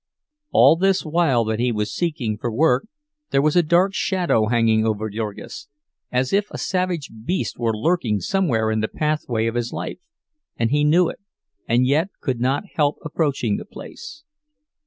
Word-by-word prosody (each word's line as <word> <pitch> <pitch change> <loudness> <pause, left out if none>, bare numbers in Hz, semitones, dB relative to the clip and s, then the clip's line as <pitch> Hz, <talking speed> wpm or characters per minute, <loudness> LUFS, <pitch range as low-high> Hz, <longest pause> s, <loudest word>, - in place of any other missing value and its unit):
All 165 - +6
this 195 +1 +2
while 155 -7 +2
that 110 0 -2
he 125 0 +1
was 105 -2 -2
seeking 145 -11 -2
for 120 - -2
work, 130 - +2 0.4
there 135 - +2
was 150 +3 +2
a 175 - +6
dark 175 +4 +2
shadow 175 - +1
hanging 115 -1 +3
over 110 -1 -1
Jurgis; 110 +7 -6 0.4
as 125 +4 0
if 205 +1 +2
a - - -7
savage 180 -5 -2
beast 125 - -2
were 115 -2 0
lurking 120 - +1
somewhere 120 - 0
in 110 - 0
the 110 - 0
pathway 150 -7 -1
of 115 - -1
his 120 0 -2
life, - - -5 0.6
and 115 -1 0
he 145 +1 +2
knew 165 +4 +4
it, - - -6 0.5
and 120 +2 +3
yet 150 +8 +2
could 130 -5 -2
not 130 +7 0
help 145 -2 +1
approaching 140 -8 0
the - - -6
place. 310 -9 -11
135 Hz, 175 wpm, -22 LUFS, 115-170 Hz, 0.6 s, All